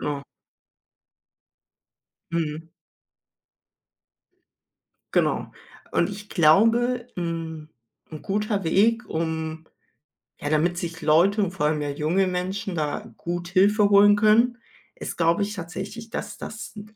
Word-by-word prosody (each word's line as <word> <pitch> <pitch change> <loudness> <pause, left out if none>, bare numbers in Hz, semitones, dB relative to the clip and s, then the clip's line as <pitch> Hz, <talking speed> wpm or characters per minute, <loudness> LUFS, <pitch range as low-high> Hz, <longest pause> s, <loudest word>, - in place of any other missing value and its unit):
Ja. 145 -1 -3 2.1
Mhm. 160 0 -3 2.4
Genau, - - +1 0.4
und 170 - +2
ich 205 0 -9
glaube, 230 +9 +4
hm, 165 -3 -4 0.4
'n 155 - -8
guter 210 -1 -1
Weg, 225 +8 +2
um 160 0 -3 0.7
ja, 145 - -3
damit 170 +3 +1
sich 170 -1 -5
Leute 175 +7 +4
und 185 - -1
vor 185 -5 -2
allem 150 0 0
mehr 145 -1 -2
junge 170 +7 +1
Menschen 185 +1 -3
da 150 -2 -3
gut 175 0 -4
Hilfe 200 +3 +4
holen 205 0 +7
können, 225 +4 +4 0.4
ist, - - -6
glaube 170 +4 +2
ich, 205 +1 -1
tatsächlich, 195 +6 -7
dass - - -5
das 220 - -8
n 210 +1 -11
180 Hz, 115 wpm, -24 LUFS, 160-205 Hz, 2.4 s, holen